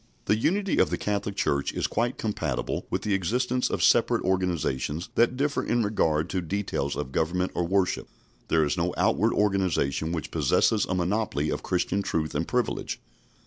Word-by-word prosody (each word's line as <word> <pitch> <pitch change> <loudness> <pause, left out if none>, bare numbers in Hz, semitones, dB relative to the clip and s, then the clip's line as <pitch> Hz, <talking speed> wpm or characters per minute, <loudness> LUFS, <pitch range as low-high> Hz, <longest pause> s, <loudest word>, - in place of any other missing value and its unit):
The - - +3
unity 190 - +1
of - - +4
the - - -1
Catholic 100 -1 -2
Church 70 -7 0
is - - -1
quite 120 +3 -1
compatible 110 -2 -2
with - - -2
the 105 - 0
existence 125 +7 0
of - - -1
separate - - +4
organisations 85 -4 -1
that 120 +2 +2
differ 140 +1 0
in 120 -1 +1
regard 80 -7 +1
to 95 - 0
details 90 -5 -2
of 65 - -4
government 90 +5 0
or 85 - -1
worship. 95 0 0 0.4
There 80 -1 +3
is 75 - 0
no 85 +1 -1
outward 110 +4 +2
organisation 90 -7 +1
which 80 -4 -4
possesses 110 -3 +2
a 90 - 0
monopoly 90 -4 0
of - - -2
Christian 95 +2 0
truth 80 -5 -2
and 80 +3 -1
privilege. 125 -3 -1
95 Hz, 175 wpm, -26 LUFS, 80-110 Hz, 0.4 s, of